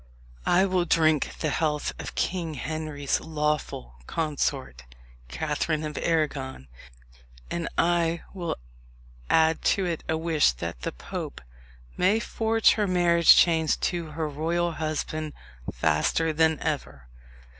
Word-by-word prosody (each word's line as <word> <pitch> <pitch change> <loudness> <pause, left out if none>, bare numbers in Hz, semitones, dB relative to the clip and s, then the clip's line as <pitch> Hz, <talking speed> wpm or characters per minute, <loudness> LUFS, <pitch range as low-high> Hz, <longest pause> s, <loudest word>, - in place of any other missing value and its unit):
I 185 +2 +5
will 185 -2 +1
drink 155 -3 +2
the 155 - 0
health 150 -1 0
of - - -7
King 170 -4 -1
Henry's 155 0 -2
lawful 150 - -2
consort, 135 - -2 0.5
Catherine 155 - -1
of 150 -1 -4
Arragon; 145 - -1 0.8
and 170 -1 -2
I 170 -1 +2
will 175 -4 -3 0.7
add 160 0 +4 0.2
to 195 - 0
it 170 -3 -3
a 160 - +1
wish 160 - +2
that - - -6
the - - -2
Pope - - -6 0.6
may 195 +5 +3
forge 225 -1 +2
her 210 -2 +1
marriage 175 -2 +6
chains 160 -2 +4
to 170 -3 -4
her 160 0 -2
royal 165 +4 -1
husband 155 -1 -3 0.4
faster 80 - +1
than 160 0 +3
ever." 140 - -3
160 Hz, 125 wpm, -26 LUFS, 150-170 Hz, 0.8 s, marriage